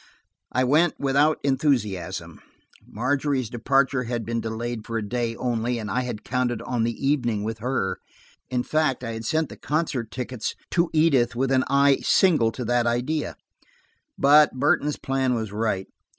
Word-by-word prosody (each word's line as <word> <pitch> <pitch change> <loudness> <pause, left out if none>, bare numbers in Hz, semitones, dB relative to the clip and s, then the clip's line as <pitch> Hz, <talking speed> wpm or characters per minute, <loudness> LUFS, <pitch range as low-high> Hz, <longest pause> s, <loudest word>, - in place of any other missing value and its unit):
I 130 - +1
went 155 +6 +2
without 145 +3 +3
enthusiasm. 100 - -1 0.5
Margery's 130 +1 -1
departure 130 +2 +1
had 120 -1 -3
been 115 +1 -2
delayed 115 0 -4
for 115 +1 -4
a 105 -2 -3
day 115 0 -2
only, 120 0 -1
and 110 -3 -5
I 125 - +1
had 120 -4 -5
counted 125 -2 -1
on 120 -3 -1
the 115 +4 -2
evening 120 -7 +1
with 110 0 -4
her. 120 -5 -1 0.5
In 125 -1 0
fact, 155 -4 0
I 115 - -3
had 115 0 -6
sent 160 +4 0
the - - -10
concert 145 -7 -2
tickets 125 -1 -4 0.2
to 170 -1 +2
Edith 140 -7 +3
with 135 +2 0
an 130 -1 +3
eye 140 0 +4
single 155 -12 +3
to 125 +1 -5
that 120 0 +1
idea. 125 +6 -1 0.8
But 150 +2 +6
Burton's 145 +2 +1
plan 135 -2 0
was 110 -3 -3
right. 105 -3 -1
125 Hz, 165 wpm, -24 LUFS, 115-140 Hz, 0.8 s, But